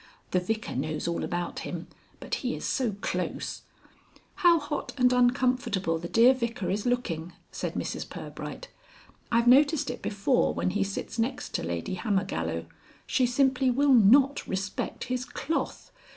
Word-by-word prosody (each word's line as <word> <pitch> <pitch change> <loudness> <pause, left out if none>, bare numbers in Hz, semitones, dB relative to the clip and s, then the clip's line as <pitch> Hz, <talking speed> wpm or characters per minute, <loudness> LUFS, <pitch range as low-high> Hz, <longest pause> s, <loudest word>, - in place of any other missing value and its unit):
The 180 - +3
Vicar 220 +4 -3
knows 155 +4 -2
all 170 - -1
about 175 -1 -3
him, 170 -1 -5 0.3
but - - -8
he - - -1
is - - -6
so 245 -6 0
close - - -3 0.4
" - - -30
"How 345 -1 +7
hot 295 -1 -4
and 250 -1 +4
uncomfortable 245 -8 +2
the 170 +1 -6
dear 240 +3 +6
Vicar 235 -6 -2
is 205 +4 -1
looking," 175 -9 -1 0.2
said - - -4
Mrs - - -4
Pirbright. - - -7 0.6
"I've 235 0 +3
noticed 285 +4 +5
it - - -8
before 205 +5 +1
when 185 - 0
he 200 +1 +1
sits 200 +3 -5
next 255 +3 -2
to - - -1
Lady 85 - -3
Hammergallow. 85 - -1 0.4
She 255 - +2
simply 260 +1 +2
will 275 +2 +4
not 260 +5 +5
respect 195 +1 -3
his 255 0 -2
cloth. 280 +5 -3
235 Hz, 155 wpm, -28 LUFS, 180-255 Hz, 0.6 s, How